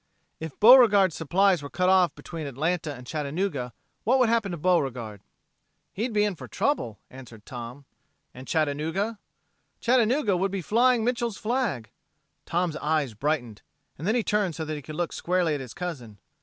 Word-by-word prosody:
If 160 -3 -8
Beauregard's 210 -6 +7
supplies 180 +2 +2
were 140 - -7
cut 180 +4 0
off 185 -4 +4
between 160 -3 -7
Atlanta 155 +4 -2
and 125 -3 -10
Chattanooga, 150 -2 -3 0.3
what 250 +5 +3
would 250 -3 +3
happen 225 -4 +1
to 170 - -4
Beauregard?" 130 - 0 0.7
"He'd 230 +5 -2
been 210 -1 +2
in 195 - -6
for - - -10
trouble," 120 - -1
answered 120 -5 -13
Tom. 125 +3 -8 0.5
"And 130 +1 -11
Chattanooga...?" 160 +8 -1 0.6
"Chattanooga 240 -3 +2
would 190 +2 0
be 195 -2 -3
flying 235 +3 +3
Mitchel's 235 -3 -1
flag." 210 - -2 0.6
Tom's 170 -2 -1
eyes 150 -5 0
brightened, 125 -2 -2 0.4
and 165 +7 -2
he 235 - +1
turned 205 -6 0
so 160 - -4
that 155 - -4
he 145 - -6
could 155 +3 -9
look 175 +1 -2
squarely 180 -2 0
at 145 - -2
his 125 -4 -9
cousin. 135 - -6
170 Hz, 165 wpm, -26 LUFS, 140-205 Hz, 0.7 s, Beauregard's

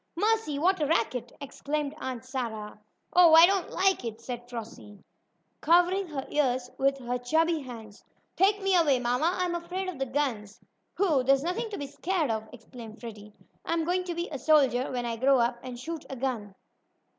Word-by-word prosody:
"Mercy! 425 -5 +1
What 360 +3 +2
a 295 - +2
racket!" 245 -4 0
exclaimed 285 +1 -3
Aunt 255 -1 -5
Sarah. 225 -6 -5 0.3
"Oh, 345 -3 +7
I 330 +1 +10
don't 385 0 0
like 380 -4 +1
it!" 225 -1 -5
cried 245 -1 -6
Flossie, 225 -3 -9 0.6
covering 355 +4 +3
her 280 -4 -5
ears 255 -4 0
with 275 0 +2
her 250 -1 -3
chubby 320 +6 +1
hands. 225 -5 -11 0.3
"Take 400 +2 +2
me 390 -1 +3
away, 305 -7 +4
mamma; 250 +7 +1
I'm 360 -1 0
afraid 355 +2 -4
of 355 -7 -6
the 270 - -1
guns!" 245 -7 -2 0.4
"Pooh! 335 -9 +3
There's 270 +1 +3
nothing 420 +7 -2
to 415 - -5
be 285 - -4
scared 305 +1 -1
of!" 220 0 -4
exclaimed 230 -1 -11
Freddie. 210 -3 -10 0.3
"I'm 330 -1 -1
going 365 +2 0
to 350 -2 -4
be 340 +1 -3
a 280 - -4
soldier 270 -5 +3
when 245 -1 -2
I 230 -1 -3
grow 270 +3 +4
up, 240 0 +1
and 255 -1 -7
shoot 325 +4 -6
a 270 - -5
gun." 235 -6 -3
275 Hz, 185 wpm, -28 LUFS, 245-340 Hz, 0.6 s, I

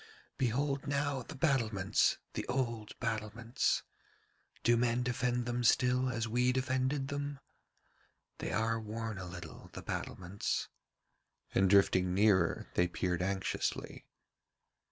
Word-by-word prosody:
'Behold 135 +3 0
now 140 -1 0
the 150 +6 -9
battlements, 115 - +2 0.2
the - - -2
old 115 -4 -2
battlements. 115 +1 -1 0.8
Do 120 - +5
men 120 +1 +2
defend 125 0 0
them 120 0 -1
still 125 +2 +3
as 115 -2 -1
we 125 +3 +2
defended 130 +1 0
them? 145 -1 -3 1.0
They - - -3
are 115 +1 +1
worn 110 -1 -4
a 90 - -5
little, 85 0 -9
the - - -7
battlements,' 95 +2 -3 0.9
and 95 0 +4
drifting 95 -2 +4
nearer 95 -5 +3
they 90 - +3
peered 90 0 -1
anxiously. 95 0 -2
115 Hz, 115 wpm, -33 LUFS, 100-130 Hz, 1.0 s, Do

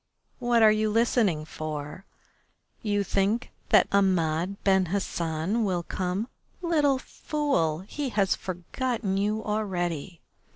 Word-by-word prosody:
"What 240 -2 +3
are 215 - +8
you 215 0 +1
listening 215 -8 +2
for? 155 +4 -6 0.8
You 205 -2 0
think 200 +5 0 0.2
that - - +6
Ahmed 185 -2 +2
Ben 190 -2 +3
Hassan 175 +2 -1
will 180 -4 0
come? 185 +5 -2 0.4
Little 300 -5 +3
fool! 265 - -1
He 270 +8 -4
has 200 -4 +2
forgotten 195 +4 -3
you 210 +2 0
already. 180 -6 -2
200 Hz, 115 wpm, -27 LUFS, 175-225 Hz, 0.8 s, are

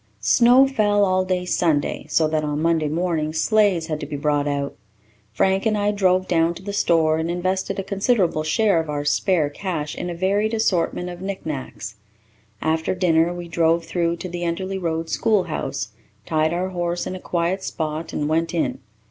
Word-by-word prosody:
Snow 240 - +5
fell 205 -6 +2
all 185 0 +2
day 180 -1 -1
Sunday, 160 -5 0
so 160 - +3
that, 155 0 -1
on 150 0 -2
Monday 160 -1 +1
morning, 160 -1 -1
sleighs 195 0 +2
had 155 -2 -3
to - - -6
be - - -5
brought 145 0 0
out. 140 -1 -2 0.6
Frank 190 - +1
and 215 -1 +1
I 205 0 +1
drove 185 -2 +2
down 165 0 +2
to 185 - -11
the 200 +1 -5
store 160 -5 +2
and 160 +1 -2
invested 185 +2 -1
a 195 - -2
considerable 195 -4 +1
share 190 +4 +2
of 160 -1 -3
our 145 -1 -3
spare 155 +2 +2
cash 155 -3 -4
in 175 - -4
a 175 - -4
varied 200 +5 +1
assortment 180 -4 0
of 175 0 -8
knick 195 0 -5
knacks. 135 -7 -6 0.7
After 160 +3 0
dinner 170 -2 +2
we 175 -1 -6
drove 165 0 +1
through 170 0 0
to 185 - -6
the 175 0 -6
Enderly 185 +3 -2
Road 165 -1 -2
schoolhouse, 160 - -1 0.4
tied 155 0 +1
our 180 +2 -1
horse 175 -1 -2
in - - -4
a - - -6
quiet 175 +2 -1
spot, 155 -1 -4
and 145 - -2
went 165 +3 0
in. 165 - -1
170 Hz, 190 wpm, -22 LUFS, 160-190 Hz, 0.7 s, Snow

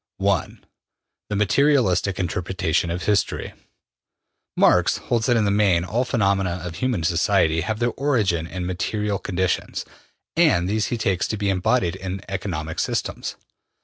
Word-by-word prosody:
1. 100 -1 -1 0.7
The 105 - -2
Materialistic 105 -3 +2
Interpretation 90 -2 -1
of 85 +1 -3
History. 105 +2 0 1.0
Marx - - +4
holds 115 -2 -1
that 120 -2 +4
in 110 - +2
the 100 - +2
main 100 -5 +3
all 115 +7 0
the - - -11
phenomena 95 -6 +1
of 85 -2 -6
human 125 -9 -1
society 80 -1 +2
have 105 +5 -2
their 120 +1 0
origin 105 - 0
in 90 0 -5
material 100 +3 -2
conditions, 95 -1 -2 0.5
and 145 - +3
these 105 +2 0
he 120 - -2
takes 95 -6 0
to 110 - -3
be 100 -1 0
embodied 90 -1 +1
in 95 0 -5
economic 90 -5 -4
systems. - - -2
95 Hz, 145 wpm, -23 LUFS, 90-110 Hz, 1.0 s, Marx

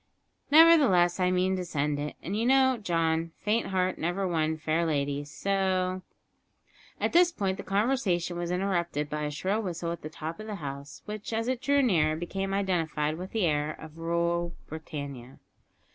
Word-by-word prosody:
Nevertheless, 280 - +6
I 180 0 +3
mean 185 +1 +2
to 180 - -2
send 150 -3 -1
it. 150 +1 -4
And 190 - -3
you 220 - 0
know, 260 +1 +4
John, 165 -3 0
`faint 220 +2 +2
heart 185 -1 0
never 175 +4 -1
won 160 -2 0
fair 160 +2 0
lady,' 145 -3 -1
so 185 +2 0 0.5
" - - -29
At - - -1
this 350 +1 +6
point 195 - -2
the - - -6
conversation 195 -5 0
was 175 0 -3
interrupted 175 -5 -1
by 150 0 -2
a - - -1
shrill 190 +9 -1
whistle 175 -4 -3
at 170 - -6
the 155 - -6
top 160 +1 -6
of 215 - -7
the 210 - -4
house, 140 -3 -7
which, 210 +1 -6
as 225 +1 -1
it 255 -1 -1
drew 280 -1 +3
nearer, 160 -10 +3
became 195 +4 -3
identified 165 -5 0
with 185 +1 -6
the 220 -5 +1
air 150 -1 0
of 160 +1 -12
"Rule 170 +1 -1
Britannia!" 140 -5 -7
175 Hz, 180 wpm, -28 LUFS, 155-195 Hz, 0.5 s, Nevertheless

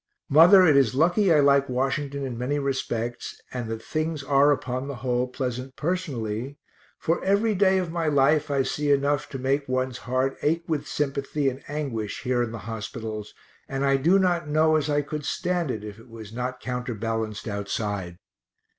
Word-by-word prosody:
Mother, 180 +6 +8
it 155 -4 +5
is 135 -3 +3
lucky 175 +6 +3
I 150 -2 +6
like 140 -1 +4
Washington 135 +2 -1
in 125 -3 -4
many 125 +5 -1
respects, 125 -4 -3
and 120 -3 -4
that 110 0 -5
things 155 -1 -2
are 140 +1 +4
upon 130 -1 -2
the 140 - -5
whole 125 0 +1
pleasant 125 0 -4
personally, 140 -7 -3 0.4
for 165 - -1
every 205 +3 +2
day 190 -1 +3
of 180 -3 -2
my 165 -1 -1
life 150 +1 +3
I 140 -1 +2
see 145 +2 -1
enough 140 +1 +1
to 135 - -5
make 135 +2 -1
one's 130 0 -1
heart 130 +2 -1
ache 165 +3 +1
with 155 -4 -2
sympathy 140 0 -1
and 130 +1 -8
anguish 135 -8 -4
here 125 -1 +1
in 120 -2 -2
the 115 - -5
hospitals, 110 -1 -6 0.3
and 135 +1 -1
I 135 0 +3
do 170 +8 +4
not 175 -4 +1
know 155 +1 +3
as 155 -1 0
I 145 0 +1
could 150 +1 -5
stand 175 0 -1
it 110 -4 -3
if 105 0 -8
it 115 +2 -16
was 110 -2 -10
not 125 +1 -4
counterbalanced 115 -3 -3
outside. 100 -3 -3
135 Hz, 180 wpm, -25 LUFS, 120-150 Hz, 0.4 s, Mother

